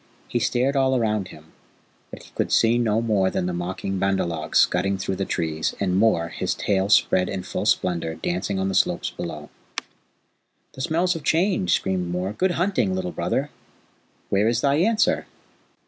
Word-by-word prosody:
He 120 - -1
stared 125 +4 +1
all 130 -1 +3
round 105 -4 0
him, 80 -1 -15 0.6
but - - -10
he - - -17
could - - -2
see 115 +1 +4
no 115 -1 +1
more 100 -4 +2
than 90 - -2
the 90 - -2
mocking 95 +2 -3
Bandar 95 0 +1
log 80 -2 -5
scudding 95 +2 +3
through 95 0 -3
the 95 - -1
trees, 80 -3 -2
and 90 -2 0
Mor, 95 -5 +2
his - - -2
tail 100 -1 0
spread 95 -3 +4
in 95 -3 -4
full - - -3
splendour, 85 -3 0
dancing 90 +4 -2
on 95 0 0
the 95 - -2
slopes - - +1
below. 75 -3 -7 1.2
"The 130 - -8
smells 170 +6 +1
have 165 - -6
changed," 165 - +2
screamed 90 -2 -2
Mor. 90 +3 -2
"Good 185 - +1
hunting, 130 - +1
Little 90 -1 -3
Brother! - - -2 0.8
Where 100 +2 +2
is 115 0 +1
thy 140 0 +2
answer?" 215 +6 +2
95 Hz, 180 wpm, -23 LUFS, 90-120 Hz, 1.2 s, see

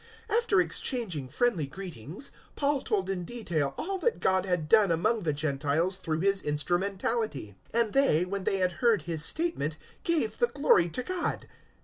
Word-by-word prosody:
021:019 445 - +4
After 450 -5 +2
exchanging 195 - -2
friendly 175 - +1
greetings, 175 - -7 0.2
Paul 285 -1 +1
told 195 -3 -1
in 190 -2 -2
detail 165 - -2
all 385 +2 -3
that 475 +3 0
God 190 0 +1
had 175 -4 0
done 215 +1 +5
among 190 +7 +1
the 165 -5 0
Gentiles 150 +5 0
through 160 -4 -2
his 195 0 +3
instrumentality. 175 - -1 0.2
021:020 235 - +5
And 215 - -8
they, 270 - +3
when 195 +1 -4
they 195 - +1
had 185 -1 +1
heard 230 - +3
his 160 -2 -3
statement, 165 - 0 0.3
gave 315 -10 0
the 480 - +4
glory 230 - +3
to 250 +10 -3
God. 370 +3 -3
190 Hz, 170 wpm, -29 LUFS, 160-240 Hz, 0.3 s, done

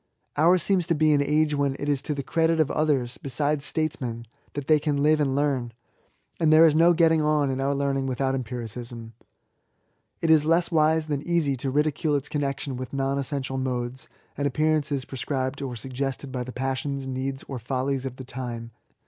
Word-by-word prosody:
Ours 170 +4 +4
seems 185 -4 +1
to 170 - +2
be 155 0 +4
an 145 - +3
age 150 +1 +2
when 140 -2 0
it 145 - -4
is 145 -2 +1
to 150 +1 -2
the 140 - -3
credit 165 +3 +1
of 155 -1 +2
others, 140 -6 0
besides 145 +2 0
statesmen, 125 -7 -2 0.3
that 145 -2 -4
they 155 +1 +4
can 145 -1 0
live 155 +1 +4
and 135 -3 +1
learn; 135 -5 0 0.7
and 160 -2 +3
there 160 +1 +8
is 160 - +5
no 165 +3 +5
getting 165 -1 +4
on 150 -2 +2
in 130 0 -2
our 140 +1 +1
learning 135 -1 0
without 130 +1 0
empiricism. 120 -2 -5 1.1
It 165 - +2
is 155 -2 +6
less 165 +3 +2
wise 160 0 +3
than 145 -3 -2
easy 165 -4 +1
to 135 +2 -2
ridicule 150 +2 +1
its 140 -1 -2
connection 140 -2 -2
with 130 +1 -7
non 135 0 0
essential 135 -1 -3
modes 125 0 -3 0.3
and 145 +1 0
appearances 150 -2 0
prescribed 135 0 -3
or 130 -3 -4
suggested 135 +3 -4
by 125 -1 -3
the 125 - -7
passions, 135 +2 -3
needs, 135 +1 -3
or 135 -3 -5
follies 130 +2 -2
of 130 - -7
the 130 - -9
time. 120 -2 -6
140 Hz, 190 wpm, -25 LUFS, 130-155 Hz, 1.1 s, there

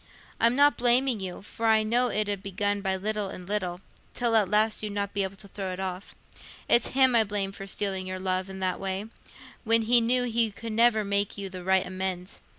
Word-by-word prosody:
I'm 235 +1 +3
not 285 +1 +4
blaming 245 0 +2
you, 190 0 -6
for 225 +2 -3
I 220 -1 +4
know 240 +3 +2
it 215 -3 0
'ud 200 -2 -3
begin 205 +1 -2
by 190 -1 0
little 210 +1 -2
and 180 -1 -9
little, 185 -3 -2 0.3
till 235 -2 +1
at 210 -4 +4
last 215 +1 +3
you'd 210 -1 -4
not 200 -1 -3
be 200 - 0
able 190 0 -3
to 200 +1 -9
throw 195 -1 -5
it 180 - -7
off. 185 0 -5 0.5
It's 235 - +4
him 260 -2 +5
I 225 - +5
blame 200 -2 -3
for 195 0 -9
stealing 190 -1 -2
your 185 0 -4
love 185 0 -2
i' - - -8
that 185 -1 -2
way, 195 +1 -3 0.6
when 230 -1 +3
he 240 +2 +4
knew 245 +2 +2
he 235 -2 +1
could 225 +2 -7
never 225 -1 +3
make 200 0 -1
you 200 -1 -5
the 185 -1 -8
right 190 +1 +2
amends. 185 0 -4
205 Hz, 225 wpm, -27 LUFS, 190-225 Hz, 0.6 s, him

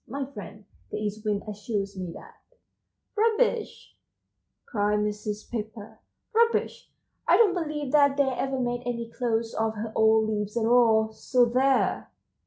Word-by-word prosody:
My 275 +3 -4
friend, 210 -5 -10 0.2
the - - -4
East 210 0 -4
Wind, 205 -1 0
assures 205 -1 -4
me 185 -1 -5
that"— - - -12 0.8
151 450 +2 +3
"Rubbish," 455 - -9 0.7
cried 210 -2 0
Mrs. 210 0 -4
Pepper, 220 -1 -6 0.3
"rubbish! 460 +1 +1 0.4
I - - +6
don't 430 -5 +5
believe 300 -6 -3
that 285 -2 +4
they 280 - +5
ever 265 +1 -2
made 245 -1 -1
any 235 -1 -3
clothes 230 -2 -1
of 220 0 -1
her 220 +1 -5
old 220 0 +4
leaves 210 0 -2
at 225 - +1
all, 225 -2 +4
so 245 +3 +2
there!" 260 +3 +1
225 Hz, 150 wpm, -26 LUFS, 210-270 Hz, 0.8 s, I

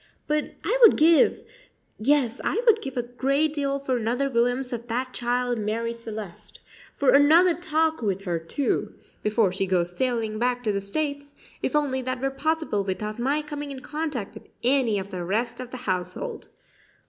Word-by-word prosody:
But 300 0 -1
I - - +1
would 460 - +8
give 320 +1 +5 0.6
yes, 265 0 +2
I - - 0
would 450 -2 +5
give 270 -1 -6
a 245 - +1
great 275 +5 0
deal 280 -2 -1
for 270 -2 -1
another 245 +4 0
glimpse 245 +2 +1
of 235 0 -5
that 255 +2 -2
child 245 0 0
Marie 225 +2 -2
Celeste 220 -5 -9 0.4
for 275 -2 +3
another 315 +6 +6
talk 320 -3 0
with 195 -3 -1
her, 175 -3 -1
too, 165 - -2 0.3
before 210 -2 +2
she 195 +1 -1
goes 175 -1 0
sailing 230 -3 -1
back 245 +1 0
to 215 - +1
the 200 -1 -1
States, 285 +7 -3 0.3
if - - -1
only 275 -3 +1
that 255 0 -3
were 270 +1 -1
possible 310 -6 -1
without 210 +3 -4
my 280 +5 0
coming 295 -1 -6
in 270 -2 -7
contact 295 -8 -4
with - - -12 0.2
any 250 -4 +3
of 195 +1 -5
the 180 -2 -4
rest 230 +6 -1
of 255 -1 -6
the 255 - -7
household. 185 - -3
250 Hz, 180 wpm, -25 LUFS, 215-285 Hz, 0.6 s, would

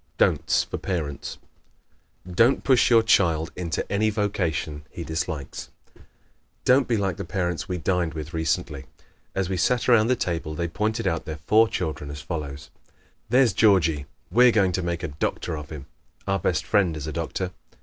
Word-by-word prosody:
Don'ts - - +2
for - - -6
Parents 80 -7 -4 0.9
¶ 90 - -8
Don't 120 +8 +4
push 130 -3 +4
your 115 -2 +6
child 85 -7 +3
into 85 -3 -2
any 105 +2 +2
vocation 85 -8 -2
he 85 - -7
dislikes. 80 -3 -4 1.0
Don't 130 +1 +4
be 115 - +1
like 95 -3 -1
the 100 - -4
parents 90 -1 -2
we 90 - -1
dined 90 -2 0
with 80 +2 -6
recently. 75 -4 -2 0.5
As 95 -2 0
we 95 0 -2
sat 125 +7 +1
around 115 -3 +5
the 130 - +3
table 85 -7 -3
they 85 +2 -1
pointed 110 +6 -2
out 85 -4 -1
their 80 -1 -5
four 110 +5 +5
children 80 -8 -3
as 70 0 -6
follows: 75 -2 -6 0.6
"There's 125 -3 +4
Georgie 85 -9 +3 0.2
we're 125 +5 +6
going 100 -5 +3
to 95 - -1
make 85 0 -3
a - - -1
doctor 75 +2 -3
of 75 -1 -7
him. 75 -3 -8 0.4
Our 95 0 +1
best 85 0 0
friend 95 -7 +2
is 75 - -5
a 80 - -4
doctor. 85 +3 -3
90 Hz, 175 wpm, -25 LUFS, 80-105 Hz, 1.0 s, your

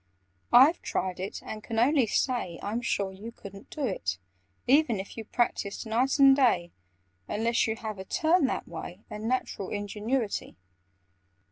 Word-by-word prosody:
"I've 275 +7 +7
tried 185 -1 -2
it, 190 +2 -5
and 215 -1 -6
can 225 - -5
only 255 +1 +4
say 215 -7 0
I'm 220 +4 -2
sure 200 -4 -1
you 205 +5 -9
couldn't 200 -3 -12
do 305 - -7
it, 95 - -2 0.5
e 280 +5 +6
ven 235 -10 -3
if 190 - -7
you 225 - -5
practised 220 -3 -1
night 245 +6 +1
and 275 -1 +8
day, 205 -11 +2 0.6
Unless 230 +2 +1
you 220 - -1
have 220 -3 -6
a - - -5
turn 315 - +2
that - - -3
way, 175 +3 -8
And 210 +1 -5
natural 245 -6 -2
ingenuity. 210 +3 -2
220 Hz, 160 wpm, -28 LUFS, 200-255 Hz, 0.6 s, and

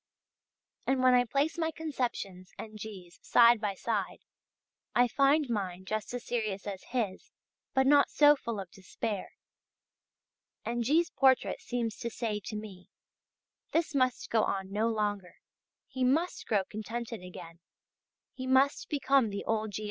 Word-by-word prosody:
And 265 -1 +2
when 255 0 +6
I 245 0 +5
place 285 +7 0
my 320 -1 +1
conceptions 245 - -4
and 215 -1 -8
G's. 190 -5 -9
side 235 -1 +5
by 205 -3 -1
side, 205 -1 -2 0.7
I 245 0 +5
find 275 +4 +3
mine 190 -5 -3
just 215 +2 -3
as 245 - -6
serious 215 -5 -2
as 195 -2 -5
his 230 -7 -3 0.5
but 265 0 +4
not 285 +1 +5
so 295 0 +6
full 235 -6 -5
of 190 -3 -7
despair. 200 +1 -5 1.3
And 240 +1 -1
G's. 320 +8 +2
portrait 265 -2 +3
seems 235 -3 -3
to 235 - -4
say 220 -2 -3
to 220 - -5
me: 205 -4 -8 0.8
this 330 -1 +1
must 255 -2 0
go 225 - +4
on 190 -1 -2
no 215 +3 +1
longer, 205 -5 -2 0.5
he 260 - -3
must 310 +8 +1
grow 205 -3 +2
contented 230 +1 -5
again, 175 -2 -10 0.7
he 260 0 -6
must 265 +2 +3
become 275 -4 +2
the 200 0 -5
old 220 -1 0
G. - - -3
230 Hz, 150 wpm, -30 LUFS, 205-260 Hz, 1.3 s, when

